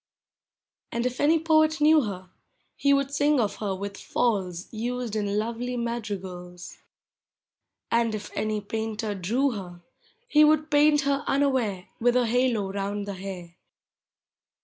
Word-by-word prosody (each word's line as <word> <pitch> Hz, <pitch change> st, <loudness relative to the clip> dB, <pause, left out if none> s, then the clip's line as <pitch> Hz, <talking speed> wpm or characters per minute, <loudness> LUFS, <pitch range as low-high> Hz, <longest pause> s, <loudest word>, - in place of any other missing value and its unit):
And 235 Hz, +1 st, -1 dB
if 250 Hz, 0 st, -2 dB
any 315 Hz, +3 st, +5 dB
poet 315 Hz, 0 st, +3 dB
knew 305 Hz, +1 st, +6 dB
her, 185 Hz, -3 st, -7 dB, 0.5 s
lie 280 Hz, -, +5 dB
would 275 Hz, 0 st, 0 dB
sing 290 Hz, 0 st, +3 dB
of 215 Hz, -4 st, 0 dB
her 200 Hz, -3 st, -2 dB
with 200 Hz, +1 st, -6 dB
falls 190 Hz, -7 st, -1 dB
Used 240 Hz, 0 st, -3 dB
in 205 Hz, -1 st, -1 dB
lovely 235 Hz, +3 st, -2 dB
madrigals. 190 Hz, -7 st, -5 dB, 1.1 s
And 230 Hz, -1 st, +2 dB
if 210 Hz, -, -7 dB
aiiy 215 Hz, -1 st, -2 dB
painter 220 Hz, -1 st, -3 dB
drew 230 Hz, +9 st, 0 dB
her, 180 Hz, -5 st, -8 dB, 0.5 s
lie 300 Hz, 0 st, +7 dB
would 310 Hz, 0 st, +3 dB
paint 295 Hz, 0 st, +5 dB
her 280 Hz, +1 st, 0 dB
unaware 255 Hz, -9 st, +1 dB
With 245 Hz, +1 st, +3 dB
a 250 Hz, -1 st, +3 dB
halo 230 Hz, -4 st, +1 dB
round 200 Hz, +1 st, -3 dB
the 200 Hz, -, -4 dB
hair. 185 Hz, -3 st, -7 dB
225 Hz, 140 wpm, -26 LUFS, 200-275 Hz, 1.1 s, lie